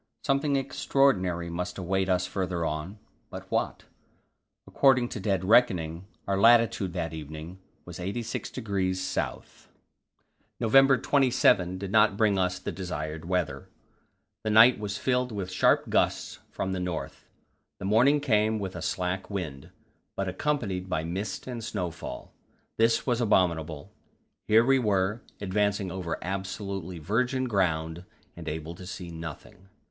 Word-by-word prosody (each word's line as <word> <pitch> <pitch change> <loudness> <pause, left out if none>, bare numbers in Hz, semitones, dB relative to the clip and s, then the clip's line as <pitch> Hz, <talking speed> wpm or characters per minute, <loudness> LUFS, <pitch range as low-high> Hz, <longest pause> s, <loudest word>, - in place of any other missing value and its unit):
Something 140 0 +1
extraordinary 130 -10 +1
must 90 +1 -4
await 95 +1 -1
us 90 -1 +2
farther 90 -2 -2
on, 75 +7 -4 0.3
but, - - -7
what? - - -1 0.8
According 130 -3 +3
to 110 - -5
dead 95 -1 0
reckoning 90 -6 +3 0.2
our 100 -1 +1
latitude 115 -5 +4
that 85 -3 -3
evening 80 +3 -8 0.3
was - - -9
86° 100 -1 -2 0.2
S. - - -5 0.9
November 135 +4 +5
27 115 -9 +3
did 95 0 -5
not 105 -2 +4
bring 105 -3 +3
us 90 0 0
the 90 - -5
desired 80 -4 -5
weather; 80 -6 -2 0.7
the 110 - -1
night 110 +2 +7
was 105 -1 -3
filled 125 +2 0
with 95 -3 -4
sharp 90 - +3
gusts - - 0
from 95 - -3
the 95 - -2
north; 90 -3 -5 0.5
the - - -7
morning 120 +9 +4
came 110 -4 +2
with 95 -3 -5
a - - -5
slack 90 +1 -2
wind, 80 -10 -5 0.5
but 100 - -2
accompanied 95 -4 -2
by 80 -3 -1
mist 95 +4 -4
and 120 -3 -6
snowfall. 90 -11 -5 0.4
This 115 0 +3
was 120 -2 +1
abominable; 85 -5 +1 0.6
here 110 +2 +5
we 135 +1 +4
were, 105 0 +1 0.2
advancing 100 -1 0
over 90 -2 -3
absolutely 95 -1 -4
virgin 125 - 0
ground, 85 -5 0 0.3
and 85 -1 -6
able 80 +2 -5
to 90 +1 -11
see 90 -1 -7
nothing. 85 +4 -9
95 Hz, 135 wpm, -28 LUFS, 90-110 Hz, 0.9 s, night